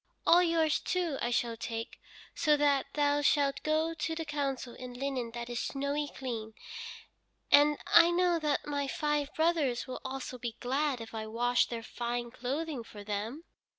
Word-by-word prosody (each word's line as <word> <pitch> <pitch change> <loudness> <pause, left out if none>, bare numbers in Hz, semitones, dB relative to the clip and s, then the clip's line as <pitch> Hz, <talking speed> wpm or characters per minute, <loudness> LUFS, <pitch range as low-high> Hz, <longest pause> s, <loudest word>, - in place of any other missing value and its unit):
All 350 - +7
yours, 330 -3 +2
too, 345 -6 -1
I 240 - 0
shall 235 -1 0
take, 225 0 -5 0.3
so 300 -1 +3
that 285 -2 +2
thou 290 0 +2
shalt 285 -1 +2
go 315 +1 +1
to 320 0 -2
the 325 0 -3
council 275 -4 -2
in 250 -1 -8
linen 260 -2 -2
that 235 0 -4
is 240 -1 -3
snowy 285 +1 -1
clean, 225 -6 -5 1.0
and 295 +1 +6
I 340 0 +7
know 350 -1 +2
that 300 -2 0
my 285 -1 -1
five 295 +1 -1
brothers 315 -7 +1
will 255 - -6
also 260 -1 -5
be 235 -1 -5
glad 270 0 0
if 225 - -9
I 220 -1 -4
wash 245 +2 +2
their 230 -1 -5
fine 240 +1 -3
clothing 270 +2 -3
for 210 -2 -11
them." 215 +9 -4
275 Hz, 170 wpm, -31 LUFS, 240-300 Hz, 1.0 s, All